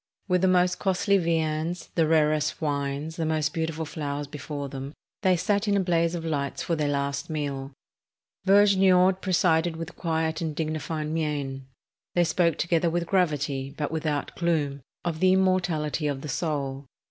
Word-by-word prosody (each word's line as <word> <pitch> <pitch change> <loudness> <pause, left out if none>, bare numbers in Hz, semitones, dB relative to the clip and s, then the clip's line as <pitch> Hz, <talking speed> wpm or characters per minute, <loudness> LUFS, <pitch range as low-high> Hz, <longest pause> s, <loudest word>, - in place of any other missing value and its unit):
With 180 -2 +2
the 190 - +4
most 180 -1 +3
costly 195 +1 +2
viands, 165 0 -1
the 165 -2 +2
rarest 155 -1 +2
wines, 145 +1 -2
the 165 - -1
most 155 -1 0
beautiful 160 -1 -2
flowers 145 -2 -4
before 145 0 -6
them, 135 +1 -7 0.3
they 185 -3 +3
sat 205 +4 0
in 200 -1 +3
a - - +3
blaze 170 -2 +1
of 165 -1 -5
lights 140 -3 -2
for 170 - 0
their 150 -2 0
last 140 0 -2
meal. 140 -3 -3 0.7
Vergniaud 190 -2 +5
presided 170 -3 +2
with 165 +1 -7
quiet 160 -1 -1
and 160 -2 -2
dignified 155 0 -2
mien. 145 -4 -2 0.5
They 175 - +5
spoke 170 -1 +2
together 170 0 +1
with 170 +1 -1
gravity, 145 -7 0
but 150 0 -2
without 155 -3 -2
gloom, 150 -5 0 0.2
of 165 -2 -2
the 185 +1 +5
immortality 175 -5 +1
of 140 -2 -2
the 150 - -6
soul. 140 -2 -2
160 Hz, 160 wpm, -26 LUFS, 145-175 Hz, 0.7 s, Vergniaud